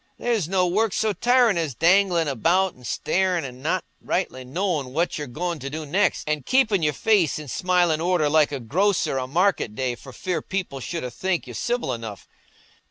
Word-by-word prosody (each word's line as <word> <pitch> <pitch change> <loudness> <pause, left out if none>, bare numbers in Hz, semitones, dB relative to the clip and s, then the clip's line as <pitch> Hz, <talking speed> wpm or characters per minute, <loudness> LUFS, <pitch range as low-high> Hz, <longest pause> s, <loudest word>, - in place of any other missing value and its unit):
There's 225 -9 -1
no 185 -1 +2
work 205 +4 +1
so 215 -1 +1
tirin' 240 -1 +3
as 155 -7 -2
danglin' 175 +2 +3
about 170 - +2
an' 125 - -18
starin' 180 0 0
an' 125 -1 -9
not 165 +4 0 0.2
rightly 155 -8 -2
knowin' 150 -2 -2
what 165 +1 0
you're 150 - -4
goin' 170 +6 -3
to 140 - -5
do 155 +2 -5
next; 190 +8 +1
and 150 -2 -1
keepin' 225 - +2
your 150 -1 +2
face 195 - +2
i' 150 - -8
smilin' 175 +2 +1
order 175 -3 +2
like 150 0 +3
a 140 - -3
grocer 170 - +1
o' 130 - -3
market 170 - +1
day 130 0 -1
for 130 +2 -11
fear 180 +7 -3
people 185 -8 -4
shouldna 130 -2 -4
think 185 +3 -2
you - - -9
civil 240 - -1
enough. 110 -5 -7
170 Hz, 190 wpm, -24 LUFS, 140-190 Hz, 0.2 s, tirin